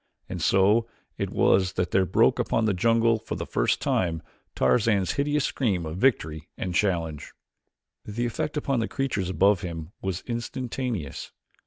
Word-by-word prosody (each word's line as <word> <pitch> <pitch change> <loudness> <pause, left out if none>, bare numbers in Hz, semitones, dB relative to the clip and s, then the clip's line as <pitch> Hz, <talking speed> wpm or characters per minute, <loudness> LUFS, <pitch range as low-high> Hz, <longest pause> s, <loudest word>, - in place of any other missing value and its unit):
And - - -5
so 105 +4 +3 0.3
it - - -1
was 95 -1 +3
that 90 -1 -1
there 95 -1 +3
broke - - +3
upon 115 - +1
this 105 - +2
jungle 115 +3 +3
for - - -5
the - - -4
first - - +1
time 80 -3 0 0.3
Tarzan's 105 -5 +2
hideous 145 0 0
scream 100 -10 0
of 80 +2 -5
victory 80 - +1
and 90 - -3
challenge. 85 -6 -1 0.7
The 115 +3 -3
effect 150 +6 -3
upon 135 -3 0
the 115 - 0
creatures 115 -10 -2
above 100 +1 +3
him 85 -3 -6
was 95 -2 -3
instantaneous. 120 - -4
100 Hz, 155 wpm, -26 LUFS, 90-120 Hz, 0.7 s, so